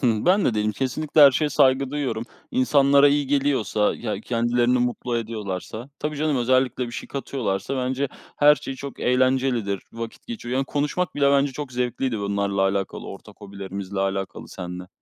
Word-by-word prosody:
Hı, 115 -3 +1
ben 190 +3 +4
de 120 - +2
değilim. 105 0 0
Kesinlikle 140 +7 0
her 140 -1 +10
şeye 150 +3 0
saygı 130 0 +3
duyuyorum. 130 -6 -2 0.3
İnsanlara 140 +2 +5
iyi 145 0 +1
geliyorsa 135 -7 +1
ya 105 -4 -4
kendilerini 120 +2 +1
mutlu 120 0 -1
ediyorlarsa 110 +1 -5
Tabii 150 0 -3
canım, 150 -1 0
özellikle 130 0 +1
bir 120 - -9
şey - - -6
katıyorlarsa, 130 -4 -3
bence, 130 +2 -1 0.3
her 150 0 +7
şey 135 - -6
çok 140 +1 -8
eğlencelidir. 125 -5 +1
Vakit 115 0 -8
geçiyor. 215 - -5
Yani 135 +1 +1
konuşmak 150 +6 -1
bile 140 -1 +3
bence 140 0 +3
çok 140 0 -6
zevkliydi 125 -1 -1
bunlarla 100 -1 -1
alakalı, 95 0 -1
ortak 100 +2 -11
hobilerimizle 100 -1 -6
alakalı 95 0 -3
senle. 90 0 -7
125 Hz, 165 wpm, -23 LUFS, 105-140 Hz, 0.3 s, her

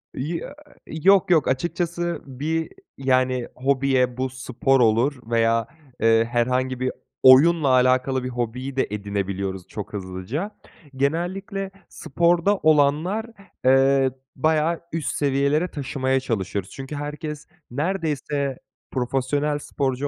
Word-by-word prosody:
Ya 165 - -4 0.3
Yok. 180 +4 +3
yok. 160 -4 +4
Açıkçası 170 +4 -1
bir, 155 +5 -3 0.3
yani, 130 -2 +1
hobiye 130 -2 +1
bu 130 0 -1
spor 130 +1 0
olur 120 +4 +3
veya 115 -1 +2 0.3
eee 115 0 +4
herhangi 125 +1 0
bir 130 0 0 0.3
oyunla 145 +4 +7
alakalı 130 +1 +3
bir 125 - -3
hobiyi 125 +2 -4
de 135 - +1
edinebiliyoruz 100 -2 -3
çok 105 0 -7
hızlıca. 100 - -4 0.4
Genellikle 190 +7 -2 0.2
sporda 170 +6 +1
olanlar 155 +8 +2 0.4
eee 135 0 +4 0.2
bayağı 160 +3 +1
üst 165 -2 -1
seviyelere 140 +4 +1
taşımaya 135 -2 -1
çalışıyoruz. 100 -5 -3
Çünkü 135 +2 -7
herkes 150 +1 -6 0.2
neredeyse 145 -3 -2 0.3
profesyonel 135 +3 -1
sporcu 140 -1 -2
135 Hz, 110 wpm, -23 LUFS, 125-155 Hz, 0.4 s, oyunla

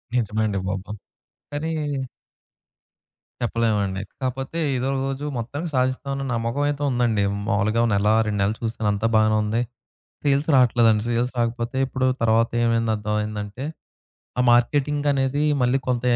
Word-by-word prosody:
నిజమే 110 -2 0
అండి 100 -2 -1
బాబు! 95 +2 -4 0.6
కానీ 155 +3 -2 1.7
చెప్పలేమండి. 105 -5 0 0.2
కాకపోతే 135 +4 -3 0.2
ఎదో 130 +2 -1 0.2
రోజు 135 +1 -3
మొత్తానికి 140 +9 -4
సాధిస్తాం 130 +2 0
అన్న 135 - -3
నమ్మకం 115 +5 -1
అయితే 145 0 -3
ఉందండి. 120 -5 +1 0.2
మాములుగా 110 +2 +2
నెల, 100 +1 +2 0.2
2 105 -1 -1
నెల్లు 105 +3 0
చూసాను 110 -2 -1
అంతా 105 +3 0
బాగానే 110 0 +4
ఉంది. 110 +3 0 0.6
సేల్స్ 140 0 +2
రాట్లేదండి. 115 -4 +4
సేల్స్ 120 +2 0
రాకపోతే 120 +2 -1
ఇప్పుడు 130 0 -1 0.2
తర్వాత 115 0 +3
ఏమైంది 115 -1 +2
అర్థమైందంటే, 105 +2 -3 0.7
ఆ - - +5
మార్కెటింగ్ 145 +4 +2
అనేది 140 +1 +1 0.2
మళ్ళీ 125 +2 +3
కొంత 125 -1 0
115 Hz, 130 wpm, -23 LUFS, 110-130 Hz, 1.7 s, ఆ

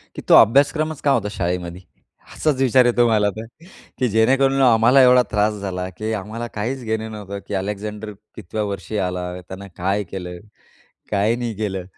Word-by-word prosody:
की - - -6
तो - - +2
अभ्यासक्रमच 145 +6 +4
का 145 - +2
होता 115 -6 +1
शाळेमध्ये? 90 -1 -3 0.5
असाच 145 -4 0
विचार 130 -1 +4
येतो 120 0 +3
मला 105 -2 +2
तर. 110 - -6 0.5
की 125 - +2
जेणेकरून 135 +5 +2
आम्हाला 120 +1 +5
एवढा 125 0 +6
त्रास 105 0 +1
झाला 90 -2 -4
की 110 +1 -3
आम्हाला 110 +3 -5
काहीच 125 +5 -3
घेणं 110 0 -3
नव्हतं 100 -2 -7
की - - -6
अलेक्झांडर 105 +2 -4 0.2
कितव्या 105 +5 -4
वर्षी 100 +1 -5
आला? 90 -2 -2
त्यानं 95 +2 -10
काय 95 +3 -1
केलं? 90 -2 -6 0.7
काय 105 +3 +1
नाही 120 -2 -4
केलं? 95 -4 -3
110 Hz, 165 wpm, -21 LUFS, 100-120 Hz, 0.7 s, एवढा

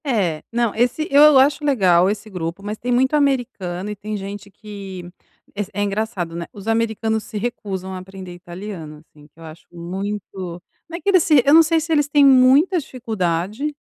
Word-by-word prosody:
É. 190 - 0
Não, 235 -2 0
esse 245 +7 0
eu 290 0 +7
acho 280 +3 +3
legal 190 -10 +3
esse 210 +1 -4
grupo, 180 0 -5
mas 210 +1 -5
tem 245 +2 -4
muito 260 +4 +2
americano 240 -10 -1
e - - -5
tem 210 +1 -5
gente 200 +1 -8
que 195 -3 -9 0.5
es 205 -1 -3
é 205 +1 -1
engraçado, 200 -4 -3
né? 170 0 -4
Os 205 +1 -11
americanos 220 -1 0
se 215 - -7
recusam 200 -5 -4
a - - -5
aprender 185 -1 -10
italiano, 175 -4 -9
assim, 150 -1 -20
que 155 - -27
eu - - -12
acho 160 +1 -12
muito 185 0 -6 0.3
não 335 - -5
é - - -12
que - - -13
eles 370 -3 +5
se 295 -6 +4
eu 285 - +5
não 325 - +9
sei 325 +1 +2
se 325 +1 -5
eles 295 -2 +2
têm 290 -1 +5
muita 275 +7 +5
dificuldade 220 - -3
210 Hz, 195 wpm, -20 LUFS, 185-260 Hz, 0.5 s, não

